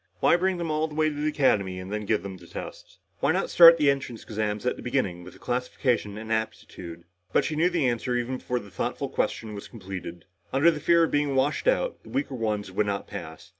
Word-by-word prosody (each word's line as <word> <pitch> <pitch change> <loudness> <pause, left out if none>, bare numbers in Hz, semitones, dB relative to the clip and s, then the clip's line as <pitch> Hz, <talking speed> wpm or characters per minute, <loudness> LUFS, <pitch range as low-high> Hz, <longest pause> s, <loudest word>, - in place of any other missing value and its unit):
Why - - +5
bring 185 +1 +1
them 170 -2 -2
all 155 +1 +1
the 150 - -10
way 155 0 +3
to 150 - -6
the 150 +1 -1
Academy 100 -11 +1
and 95 +2 -7
then 105 -1 -3
give 110 - +1
the 95 -3 -8
tests? - - -9 0.2
Why - - +2
not - - -1
start 170 -1 +9
the 145 -3 +4
entrance 130 -4 -5
exams 105 0 -3
at 125 - +1
the - - -10
beginning 100 -9 -1
with 90 - -11
the - - -17
classification 125 -3 -1
and 110 +1 -3
aptitude? 90 -6 -5 0.3
But - - +3
she 155 - -2
knew 165 +4 +3
the 170 -7 +1
answer 125 +1 -1
even 120 +2 -1
before 125 - -2
the 100 -5 -8
thoughtful - - -3
question 110 -2 -2
was 100 - -8
completed. 95 -5 -8 0.3
Under 145 +6 +5
the 155 - -5
fear 170 +2 +4
of 165 - +1
being 145 -1 +1
washed 140 - +1
out, - - +1
the - - -15
weaker 265 - -2
ones 105 -5 -2
would 105 +2 0
not 100 -1 -2
pass. 80 0 -9
125 Hz, 235 wpm, -26 LUFS, 100-150 Hz, 0.3 s, start